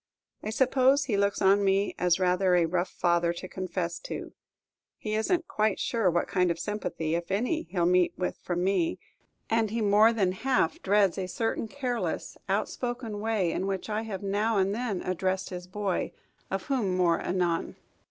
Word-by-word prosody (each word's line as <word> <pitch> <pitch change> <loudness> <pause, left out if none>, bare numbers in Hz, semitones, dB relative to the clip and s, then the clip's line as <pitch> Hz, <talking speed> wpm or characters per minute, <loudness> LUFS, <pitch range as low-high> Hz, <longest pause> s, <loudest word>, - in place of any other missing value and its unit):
I - - -4
suppose 260 +3 +3
he 245 -7 -1
looks 200 0 +1
on 200 +1 +5
me 195 +1 +2
as 180 0 +3
rather 180 0 +3
a 175 -1 +4
rough 175 +2 -1
father 170 -1 +1
to 180 +2 -7
confess 180 -2 -3
to; - - -7 0.6
he 215 - -4
is 220 +7 0
n't 345 -2 +1
quite 215 -1 0
sure 225 -6 +1
what 175 0 0
kind 180 -2 +2
of 170 - 0
sympathy, 170 -4 -3
if 170 0 -2
any, 250 - -1
he 185 - -3
'll 170 - +3
meet 180 0 +4
with 180 - -2
from 175 0 -2
me, 265 - +1 0.5
and 225 -1 +1
he 230 +3 -2
more 210 +1 +5
than 200 -5 +1
half 235 -2 0
dreads 195 -1 +3
a 185 - -2
certain 225 +3 -2
careless, 250 -1 -3
outspoken 240 -4 -2
way 210 -5 0
in 190 - -2
which 195 +2 -3
I 210 +1 0
have 205 -4 -6
now 205 +3 +1
and 195 +1 +2
then 220 -4 -2
addressed 185 +1 -1
his 180 0 -6
boy, 195 0 -2 0.4
of 195 0 -2
whom 215 -10 0
more 170 -2 +3
anon. 175 -2 -1
195 Hz, 185 wpm, -28 LUFS, 180-220 Hz, 0.6 s, on